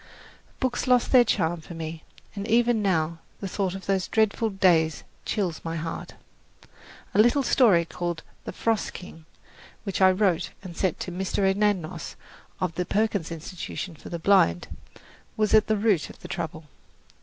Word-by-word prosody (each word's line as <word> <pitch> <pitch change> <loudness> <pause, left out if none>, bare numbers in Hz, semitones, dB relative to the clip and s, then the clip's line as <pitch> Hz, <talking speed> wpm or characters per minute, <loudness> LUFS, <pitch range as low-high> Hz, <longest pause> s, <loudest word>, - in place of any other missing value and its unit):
Books 260 0 -1
lost 250 -1 +3
their 255 -2 +8
charm 175 -7 0
for 170 - -10
me, 160 0 -6 0.3
and 200 +1 -4
even 235 0 +3
now 165 -4 0 0.2
the 195 - -4
thought 190 -1 -2
of 195 - -8
those 190 -2 0
dreadful 220 +1 +1
days 170 -5 +2 0.2
chills 185 -7 -1
my 165 0 -3
heart. 165 0 -5 1.0
A - - +2
little 240 +5 +3
story 205 -10 +4
called 170 -1 -4 0.2
"The - - -4
Frost 225 -2 -1
King," 165 -3 -11 0.6
which 195 -2 -3
I 190 - +8
wrote 185 -3 +1
and 180 -3 -8
sent 185 -2 0
to 180 - -4
Mr. 190 +2 0
Anagnos, 190 -4 0 0.4
of 180 -3 -1
the 180 +2 -2
Perkins 205 -5 0
Institution 170 +2 -6
for - - -11
the 170 - -3
Blind, 165 - +3 0.6
was 215 -1 +1
at 215 0 +6
the 215 - +2
root 200 -7 +2
of - - -12
the - - -8
trouble. 165 -3 -5
190 Hz, 165 wpm, -26 LUFS, 165-210 Hz, 1.0 s, their